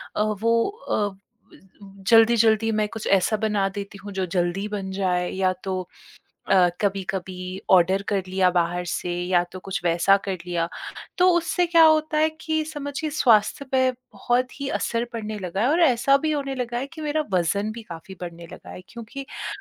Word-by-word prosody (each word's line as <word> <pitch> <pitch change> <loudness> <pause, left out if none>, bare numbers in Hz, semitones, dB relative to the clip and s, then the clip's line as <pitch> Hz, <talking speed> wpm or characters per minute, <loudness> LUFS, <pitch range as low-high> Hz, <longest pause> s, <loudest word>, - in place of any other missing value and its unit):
अ, - - +1 0.2
वो 230 0 +3
अ, 435 +4 -4
ब 195 - -16 0.9
जल्दी-जल्दी 225 -1 +5
मैं 215 -1 +1
कुछ 220 -1 -7
ऐसा 195 +2 +3
बना 210 -2 0
देती 200 0 -7
हूँ, 205 +1 -9
जो 190 -1 -2
जल्दी 180 +3 -1
बन 200 -2 -5
जाए 180 -2 0
या 185 -1 +1
तो 190 -1 -2 0.7
अ, 185 -2 +5
कभी-कभी 190 -1 -3
ऑर्डर 185 +1 +4
कर 200 -2 +1
लिया 185 -1 +2
बाहर 175 0 0
से, 175 +1 -3 0.2
या 175 -1 +3
तो 185 - -7
कुछ 195 +1 -4
वैसा 170 +3 +4
कर 195 - -1
लिया। 170 -1 -1 0.5
तो 360 +1 +5
उससे 350 +1 +1
क्या 335 -1 +5
होता 310 -1 +3
है 310 +1 +4
कि 315 -1 -1
समझिए 295 0 -5
स्वास्थ्य 235 -3 +3
पे 260 -1 +3
बहुत 250 0 -2
ही 280 - -2
असर 230 0 -1
पड़ने 215 -2 -5
लगा 190 0 -4
है 240 - +3
और 330 +4 +2
ऐसा 275 -2 +4
भी 310 +2 -1
होने 275 -2 -2
लगा 240 -2 -3
है 260 - -3
कि 325 - -9
मेरा 305 0 -1
वज़न 195 +4 0
भी 230 +1 -8
काफ़ी 175 -1 -10
बढ़ने 170 -1 -8
लगा - - -11
है, - - -9
क्योंकि 235 +4 -8
अ, 270 - -8
210 Hz, 185 wpm, -24 LUFS, 185-260 Hz, 0.9 s, जल्दी-जल्दी